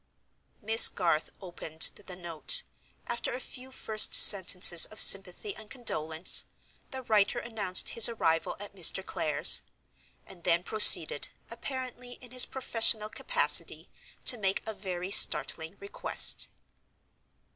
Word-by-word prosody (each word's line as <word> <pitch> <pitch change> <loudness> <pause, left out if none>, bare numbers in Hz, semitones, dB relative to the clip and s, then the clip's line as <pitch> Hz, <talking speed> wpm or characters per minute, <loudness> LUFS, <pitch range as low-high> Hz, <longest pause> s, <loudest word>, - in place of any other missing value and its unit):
Miss 225 +2 +5
Garth 165 -4 -5
opened 165 -4 -2 0.2
the 180 - -11
note. 175 - -4 0.4
After 235 0 -8
a - - -10
few 260 0 -14
first 220 -4 0
sentences 180 -3 +5
of 215 - -11
sympathy 195 +1 +4
and 215 0 -16
condolence, 160 -9 -2 0.4
the 265 0 -12
writer 215 -1 -3
announced 210 -6 +1
his 230 0 +4
arrival 165 -8 -6
at 205 -1 -14
Mr. 190 +1 +1
Clare's; - - +4 0.6
and 180 -3 -18
then 170 +1 -2
proceeded, 180 -8 +1 0.2
apparently 250 0 -11
in 245 -1 -18
his 255 0 +3
professional 225 -4 -2
capacity, - - -4 0.3
to 245 - +2
make 195 -1 -5
a 220 - -9
very 185 -2 -10
startling 160 -2 -1
request. 200 - 0
200 Hz, 125 wpm, -25 LUFS, 180-235 Hz, 0.6 s, Miss